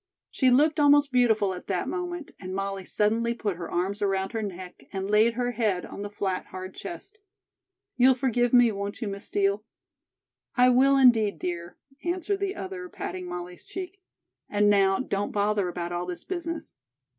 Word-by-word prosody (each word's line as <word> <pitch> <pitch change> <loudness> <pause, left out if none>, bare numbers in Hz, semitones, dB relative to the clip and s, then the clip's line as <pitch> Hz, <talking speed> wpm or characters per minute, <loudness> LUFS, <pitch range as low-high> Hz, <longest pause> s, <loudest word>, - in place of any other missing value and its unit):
She 260 - +3
looked 300 +5 +4
almost 290 -1 +5
beautiful 220 -6 +3
at 180 - -9
that 185 -3 -1
moment, 350 -3 -4
and 185 0 -6
Molly 195 0 -3
suddenly 225 +5 +1
put 205 -6 -2
her 175 - -6
arms 190 +4 -1
around 195 -1 0
her 225 -1 -2
neck 185 -3 -7
and 195 -1 -3
laid 220 +2 +4
her 245 0 0
head 210 -7 0
on - - -8
the 205 - -4
flat, 195 -2 -3
hard 185 0 -7
chest. 405 +5 -9 0.8
"You'll 255 +1 +6
forgive 245 -2 +1
me, 245 -2 +6
won't 200 +1 -5
you, 230 - -3
Miss 200 0 -6
Steel?" 200 +1 +1 0.9
"I 250 0 +6
will, 270 +2 +5
indeed, 225 -8 +5
dear," 170 +1 -5 0.3
answered 360 +3 -1
the 395 -1 -2
other, 185 -2 -6
patting 180 -1 -6
Molly's 180 0 -7
cheek. 380 +1 -7 0.5
"And 205 0 +3
now, 195 -1 +4
don't 205 -6 -2
bother 205 -1 +1
about 175 0 -4
all 175 0 -3
this 180 -1 -5
business. 335 -3 -4
210 Hz, 175 wpm, -27 LUFS, 190-255 Hz, 0.9 s, You'll